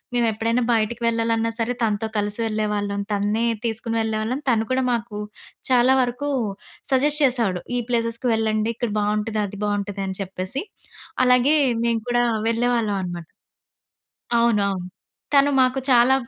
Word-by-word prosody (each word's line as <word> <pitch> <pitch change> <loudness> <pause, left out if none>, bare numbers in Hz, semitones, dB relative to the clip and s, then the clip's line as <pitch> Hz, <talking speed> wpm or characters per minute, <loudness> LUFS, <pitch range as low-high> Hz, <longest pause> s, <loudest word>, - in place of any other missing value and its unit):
మేము 240 -1 +3
ఎప్పుడైనా 230 +3 0
బయటకి 225 +1 0
వెళ్ళాలన్నా 230 0 +1
సరే 235 +2 -1
తనతో 215 0 0
కలిసి 205 +1 -1
వెళ్ళేవాళ్ళం. 210 -2 -1
తన్నే 210 +3 0 0.2
తీసుకొని 230 0 -1
వెళ్ళేవాళ్ళం. 220 +5 -2
తను 225 -2 +2
కూడా 260 0 +2
మాకు 225 -3 -4 0.5
చాలా 250 +1 +5
వరకు 250 +3 -2 0.6
సజెస్ట్ 295 +3 +3
చేసేవాడు. 230 -9 +1 0.2
ఈ - - +1
ప్లేసెస్‌కి 230 +1 0
వెళ్ళండి, 220 0 0
ఇక్కడ 240 -4 -2
బావుంటది. 210 +1 0
అది 200 0 -8
బావుంటది 205 -1 -2
అని 190 -1 -5
చెప్పేసి. 190 - -3 0.6
అలాగే 250 +4 +4 0.3
మేము 230 -1 +1
కూడా 240 0 +2 0.2
వెళ్ళేవాళ్ళం 230 -2 +1
అనమాట. 175 -2 -6 1.1
అవునవును. 200 -6 +1 0.5
తను 280 +1 +5
మాకు 255 +1 +2
చాలా 245 +2 +6
225 Hz, 135 wpm, -22 LUFS, 210-240 Hz, 1.1 s, చాలా